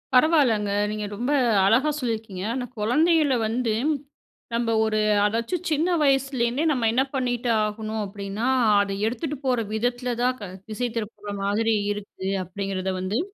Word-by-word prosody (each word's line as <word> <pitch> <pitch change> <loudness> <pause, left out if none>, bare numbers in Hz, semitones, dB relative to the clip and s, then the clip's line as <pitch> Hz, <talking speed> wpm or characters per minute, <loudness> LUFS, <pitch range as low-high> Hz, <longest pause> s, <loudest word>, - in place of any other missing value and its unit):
பரவால்லங்க. 250 -8 +4 0.2
நீங்க 210 0 -3
ரொம்ப 245 +7 -2 0.3
அழகா 250 +9 +4
சொல்லியிருக்கீங்க. 220 -7 -3
ஆனா, 255 -1 -2
குழந்தைகளை 295 +6 +3
வந்து, 230 -1 0 0.8
நம்ம 230 -1 +1
ஒரு 215 -1 +1 0.3
அதாச்சும் 230 - -1
சின்ன 310 +4 +2 0.2
வயசுலேருந்தே 270 -1 +1
நம்ம 240 -5 +1
என்ன 260 +3 +3
பண்ணிட்டு 245 -2 -1
ஆகணும் 215 +1 -3
அப்படின்னா 200 +3 -5 0.3
அத 200 -1 0 0.2
எடுத்துட்டு 295 +5 -3
போற 250 -2 +2
விதத்துல 245 +2 -1
தான் 250 +1 +2
க - - -8 0.3
திசை 245 +3 -2
திருப்புற 210 -2 -5
மாதிரி 220 +3 +1 0.2
இருக்கு 200 -2 -6 0.2
அப்படிங்கிறத 190 0 -3
வந்து. 195 +6 -1
230 Hz, 135 wpm, -24 LUFS, 210-255 Hz, 0.8 s, பரவால்லங்க